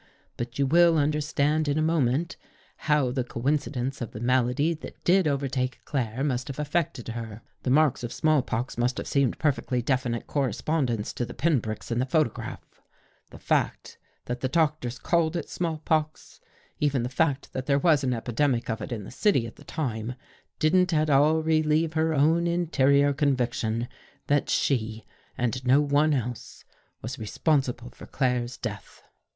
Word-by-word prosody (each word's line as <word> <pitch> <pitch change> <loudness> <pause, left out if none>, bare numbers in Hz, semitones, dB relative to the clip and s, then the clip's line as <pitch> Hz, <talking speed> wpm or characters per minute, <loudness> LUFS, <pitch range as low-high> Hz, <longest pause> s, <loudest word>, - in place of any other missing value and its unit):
But 120 +1 -5
you 140 - +2
will 170 +3 +5
understand 150 +1 +1
in 145 +1 +1
a - - +2
moment, 160 +2 +1 0.4
how 150 -5 +1
the 130 0 -1
coinci 140 +5 -1
dence 130 0 -3
of 120 - -5
the 105 - -6
malady 125 +6 +2
that 155 - -11
did 185 -1 +4
overtake 135 -2 -1
Claire 130 -2 -2
must 130 -4 -1
have 135 - -6
affected 150 -5 -2
her. 115 -1 -6 0.2
The - - -2
marks 145 -1 +3
of 120 - -4
small 155 -2 +2
pox 120 0 -4
must 125 +2 +1
have - - -4
seemed 140 -4 +1
perfectly 140 -4 0
definite 125 -1 -1
correspondents 130 -3 -1
to - - -3
the 120 - -7
pin 155 -5 +2
pricks 110 +2 -6
in 115 - 0
the 130 - 0
photograph. 155 -5 -2 0.5
The - - -12
fact - - -1 0.3
that 120 0 -4
the 130 - -1
doctors 150 -4 0
called 170 +1 +1
it 170 - -3
small 165 -3 -2
pox, 155 -1 -1 0.4
even 140 -4 +1
the - - -1
fact 140 +1 -1
that 130 0 -4
there 140 -1 +3
was 150 -1 +3
an 125 -2 +1
epidemic 120 +1 0
of 110 - -4
it - - -6
in 110 -4 -4
the - - -10
city 135 - +2
at 115 - -10
the - - -14
time, 120 -5 -3 0.4
didn't 180 +2 +3
at 155 0 +2
all 150 +3 +4
relieve 155 0 +2
her 160 0 +1
own 160 +4 +3
interior 145 -5 +3
conviction 125 -5 0 0.4
that 145 0 +1
she, 110 -4 0 0.3
and 125 +1 -1
no 130 +3 +5
one 145 +1 +3
else, 125 -2 -5 0.4
was 125 +3 -5
responsible 125 +1 -1
for - - -13
Claire's 125 -2 -1
death. 105 -4 -7
135 Hz, 170 wpm, -26 LUFS, 120-155 Hz, 0.5 s, will